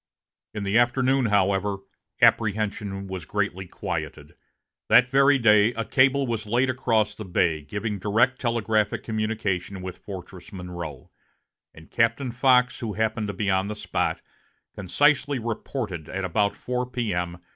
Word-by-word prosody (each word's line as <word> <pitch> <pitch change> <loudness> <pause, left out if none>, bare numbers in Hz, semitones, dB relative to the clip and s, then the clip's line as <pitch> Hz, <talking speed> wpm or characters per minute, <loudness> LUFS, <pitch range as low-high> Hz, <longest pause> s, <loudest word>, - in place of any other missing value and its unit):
In 105 - -3
the 100 +4 +3
afternoon, 130 +1 +2
however, 100 -1 +1 0.5
apprehension 105 -2 +1
was 95 -3 -6
greatly 95 +1 -2
quieted. - - -5 0.6
That 125 0 +6
very 140 +1 +5
day 110 -1 +4
a 115 0 -2
cable 135 +3 +3
was 115 -3 -3
laid 125 +4 +2
across 115 -4 +1
the 110 - -8
bay, 85 -4 0
giving 105 +7 -4
direct 115 +6 +1
telegraphic 110 -3 0
communication 110 -4 -2
with 95 -1 -7
Fortress 95 0 -10
Monroe, 90 - -8 0.6
and 80 0 -16
Captain 115 +3 +1
Fox, 125 +1 +3
who 110 -3 -4
happened 110 0 -1
to 100 - -4
be 100 +1 -1
on 95 +1 +1
the 105 - -4
spot, - - -2 0.5
concisely 140 +8 +2
reported 110 - -4
at 95 +1 -3
about 100 +3 +1
4 125 0 -3
P.M. 90 -9 -2
105 Hz, 140 wpm, -25 LUFS, 95-120 Hz, 0.6 s, That